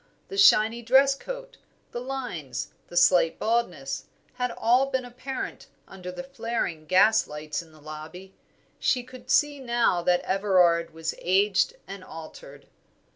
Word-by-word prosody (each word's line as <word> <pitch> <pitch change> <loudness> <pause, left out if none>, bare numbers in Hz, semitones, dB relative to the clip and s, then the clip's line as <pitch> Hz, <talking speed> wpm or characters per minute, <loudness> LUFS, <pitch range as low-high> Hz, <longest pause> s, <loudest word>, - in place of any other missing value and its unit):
The 195 - -6
shiny 220 +4 +5
dress 265 +4 +5
coat, - - -8 0.3
the 240 - -5
lines, 175 - -5 0.2
the 175 - -6
slight 175 -2 +4
baldness, 175 -12 -1 0.3
had 250 0 -2
all 245 +3 +2
been 260 -2 -2
apparent 255 +2 -6 0.2
under 180 -1 -8
the 265 - -7
flaring 230 - -4
gaslights 155 -6 +2
in 165 -2 -17
the 155 - -18
lobby. 155 +5 -10 0.5
She 250 -2 +1
could 255 +1 -14
see 295 -1 +3
now 235 -8 +1
that 175 +1 +2
Everard 180 -4 +2
was 160 0 -4
aged 195 - +2
and 195 -1 -8
altered. 160 -3 -11
195 Hz, 135 wpm, -26 LUFS, 170-250 Hz, 0.5 s, shiny